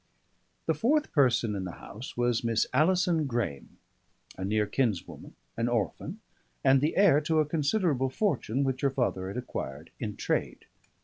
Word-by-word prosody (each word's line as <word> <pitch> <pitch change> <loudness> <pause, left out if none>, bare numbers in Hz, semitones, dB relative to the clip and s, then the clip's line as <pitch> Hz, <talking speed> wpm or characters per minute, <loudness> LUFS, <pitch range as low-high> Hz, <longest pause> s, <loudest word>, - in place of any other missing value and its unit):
The 160 - +2
fourth 275 - +1
person 125 -6 +3
in 100 -2 -3
the 90 -2 -5
house 115 +5 -9
was 120 -1 +1
Miss 115 -1 +2
Alison 165 +1 +3
Graeme, 115 - -3 0.6
a 95 - -6
near 105 +2 +1
kinswoman, 105 -4 -2 0.2
an 115 +1 0
orphan, 115 -7 -2 0.4
and 135 0 +5
the 150 +3 0
heir 185 -7 +6
to 160 +1 0
a 155 - +3
considerable 150 -2 +1
fortune 135 - 0
which 130 -1 -1
her 140 - +3
father 120 -8 -1
had 100 - -5
acquired 80 - -6
in 105 -3 -4
trade. - - -2
130 Hz, 160 wpm, -29 LUFS, 110-155 Hz, 0.6 s, heir